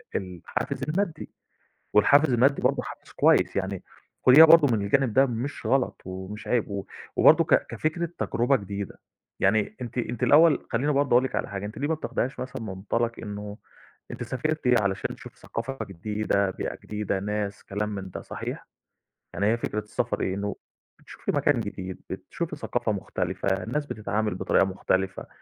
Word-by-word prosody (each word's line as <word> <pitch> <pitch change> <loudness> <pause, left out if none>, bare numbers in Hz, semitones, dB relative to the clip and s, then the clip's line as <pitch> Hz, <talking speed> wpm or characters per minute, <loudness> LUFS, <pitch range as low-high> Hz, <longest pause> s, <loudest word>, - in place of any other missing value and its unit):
الحافز 90 +7 -4
المادي، 165 +2 -2 0.7
والحافز 140 +7 +5
المادي 130 +4 +3
برضه - - +2
حافز - - -10
كويس، - - +3
يعني 95 -1 -2 0.4
خُديها 135 +5 +10
برضه 155 -7 +6
من 105 - -2
الجانب 115 +4 +2
ده 135 +1 +6
مش 125 +3 -4
غلط 135 -1 +1
ومش 95 +3 -7
عيب، 120 -3 +1
و 100 -1 -4 0.3
وبرضه - - +6
ك - - +3
كفكرة 170 +2 -2
تجربة 125 +4 +2
جديدة، 100 -2 -6 0.4
يعني 105 +2 +2
أنتِ 120 0 -6
أنتِ 120 -1 -3
الأول 160 +1 +5
خلّيني 135 +6 +1
برضه 140 0 +1
أقول 125 +2 +6
لكِ 130 - -3
على - - -2
حاجة 100 0 -4
أنتِ 105 - -8
ليه 145 +2 -1
ما 160 - +2
بتاخديهاش 135 -3 -3
مثلًا 130 - -5
من 110 - -6
منطلق 110 +5 -1
إنه 105 -1 -6 0.5
أنتِ - - -6
سافرتِ 125 -1 +1
علشان 100 -1 -1
تشوفي - - -13
ثقافة 135 +4 -5
جديدة، 100 +1 -1
بيئة - - -4
جديدة، 105 -2 -2
ناس، 105 0 -3
كلام 105 +1 -2
من 95 -1 -6
ده - - -6
صحيح؟ - - -6 0.7
يعني 100 - 0
هي 115 +2 +3
فكرة 105 -2 -2
السفر 105 0 -2
إيه؟ 95 - -1
إنه 100 +1 -3 0.4
بتشوفي - - -5
مكان - - +2
جديد، 95 0 -6
بتشوفي - - -5
ثقافة - - -1
مختلفة، 95 -1 -2
الناس 150 +8 -2
بتتعامل 110 -4 -2
بطريقة 95 +1 +3
مختلفة، 95 0 -1
110 Hz, 165 wpm, -26 LUFS, 100-130 Hz, 0.7 s, خُديها